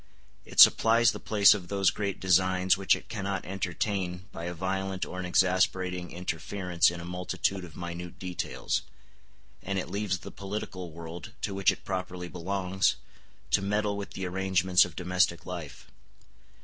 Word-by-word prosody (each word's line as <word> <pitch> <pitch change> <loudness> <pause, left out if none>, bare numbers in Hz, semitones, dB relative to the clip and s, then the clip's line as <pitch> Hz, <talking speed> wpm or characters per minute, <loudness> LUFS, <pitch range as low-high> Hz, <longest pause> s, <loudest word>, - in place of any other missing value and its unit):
It - - -5
supplies 115 0 +7
the - - -7
place 105 -2 +6
of 95 -4 -5
those 100 0 +2
great 100 -2 -3
designs 95 0 +3
which 95 0 +3
it - - -10
cannot 100 -3 -3
entertain 95 -1 -2
by 85 - -7
a 90 - -3
violent 95 +1 -2
or 90 - -7
an 90 - -3
exasperating 90 0 +1
interference 90 +1 0
in 85 0 -6
a 85 - -7
multitude 90 +2 -2
of 85 -4 -11
minute 85 0 -6
details; 90 -2 -2 0.8
and 100 0 -3
it 95 - -3
leaves 100 -2 -1
the - - -10
political 95 -3 -6
world, 85 +1 -9
to - - -2
which 95 0 +3
it - - -10
properly 90 -2 -4
belongs, 95 +2 0 0.6
to - - +4
meddle 105 +1 0
with 100 0 -6
the 95 - -4
arrangements 95 0 +3
of - - -10
domestic 90 -1 +1
life. 80 -8 -7
95 Hz, 160 wpm, -28 LUFS, 90-95 Hz, 0.8 s, supplies